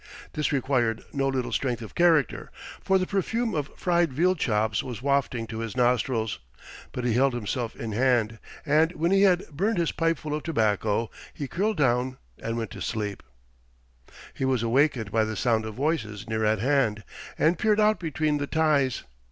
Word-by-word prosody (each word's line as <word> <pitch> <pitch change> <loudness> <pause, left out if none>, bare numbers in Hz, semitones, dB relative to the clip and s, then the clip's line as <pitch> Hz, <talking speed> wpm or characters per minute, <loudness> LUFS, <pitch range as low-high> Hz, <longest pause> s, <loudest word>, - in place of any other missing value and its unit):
This 150 - -1
required 125 -5 0
no 135 -1 0
little 130 -2 -1
strength 120 -4 -1
of 110 - -10
character, 165 -6 +2 0.3
for 190 - +3
the 185 - 0
perfume 220 +4 -1
of 150 -3 -2
fried 175 -3 +2
veal 175 +8 +3
chops 110 - 0
was 125 -2 -7
wafted 135 -4 0
to 110 0 -5
his 115 +1 -5
nostrils, 120 - +1 0.5
but 125 - -4
he 120 - +2
held 130 +2 +3
himself 120 +1 -3
in 115 - -5
hand, 115 -1 +1 0.3
and 155 +3 +3
when 170 +2 0
he 195 0 +4
had 185 -2 +3
burned 195 +8 0
his 170 -2 +1
pipeful 165 -2 -1
of 150 - -2
tobacco 110 - 0 0.2
he 140 - -4
curled 205 - -1
down 130 -2 +1 0.2
and 115 0 -3
went 115 -3 -4
to - - -9
sleep. 105 -2 -3 1.1
He - - -5
was 130 -3 +1
awakened 120 -3 +2
by 110 0 +3
the 110 0 -3
sound 110 +1 +1
of 110 - -7
voices 130 - -2
near 110 0 -1
at 110 +1 +3
hand, 115 -3 +1 0.3
and 160 +2 +2
peered 215 -1 +3
out 215 0 +3
between 155 -3 -1
the 145 - -2
ties. 145 -5 +1
130 Hz, 180 wpm, -26 LUFS, 115-160 Hz, 1.1 s, he